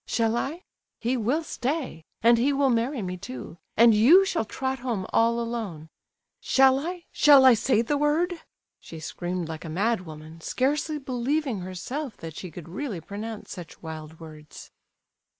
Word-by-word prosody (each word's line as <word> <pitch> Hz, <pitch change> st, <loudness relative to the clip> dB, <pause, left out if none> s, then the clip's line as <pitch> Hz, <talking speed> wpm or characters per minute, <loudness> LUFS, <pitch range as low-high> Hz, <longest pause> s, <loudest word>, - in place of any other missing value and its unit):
Shall 225 Hz, -1 st, +1 dB
I? 310 Hz, +9 st, -3 dB, 0.4 s
He 240 Hz, +3 st, 0 dB
will 255 Hz, +8 st, 0 dB
stay, 265 Hz, -, -3 dB, 0.2 s
and 235 Hz, 0 st, +6 dB
he 265 Hz, +4 st, +3 dB
will 275 Hz, -1 st, +2 dB
marry 235 Hz, +1 st, 0 dB
me 180 Hz, 0 st, -4 dB
too, 130 Hz, +1 st, -8 dB, 0.2 s
and 230 Hz, 0 st, +7 dB
you 290 Hz, -, +7 dB
shall 345 Hz, -, -1 dB
trot 265 Hz, +4 st, -3 dB
home 235 Hz, -7 st, -2 dB
all 230 Hz, +1 st, +3 dB
alone. 220 Hz, -10 st, -4 dB, 0.5 s
Shall 265 Hz, 0 st, +4 dB
I?—shall 295 Hz, -4 st, +4 dB
I 260 Hz, -, +9 dB
say 230 Hz, 0 st, +2 dB
the 285 Hz, +5 st, 0 dB
word?" 325 Hz, +4 st, +1 dB, 0.4 s
she 165 Hz, -, -10 dB
screamed 175 Hz, +2 st, -4 dB
like 160 Hz, -1 st, -7 dB
a 165 Hz, -, -7 dB
madwoman, 165 Hz, -5 st, -3 dB
scarcely 300 Hz, -, 0 dB
believing 265 Hz, -2 st, -1 dB
herself 210 Hz, +9 st, -5 dB
that 160 Hz, -2 st, -8 dB
she 185 Hz, -, -7 dB
could 170 Hz, -1 st, -10 dB
really 205 Hz, +2 st, -4 dB
pronounce 210 Hz, +5 st, -7 dB
such 175 Hz, -2 st, -10 dB
wild 160 Hz, 0 st, -8 dB
words. 155 Hz, -2 st, -12 dB
230 Hz, 155 wpm, -26 LUFS, 175-275 Hz, 0.5 s, I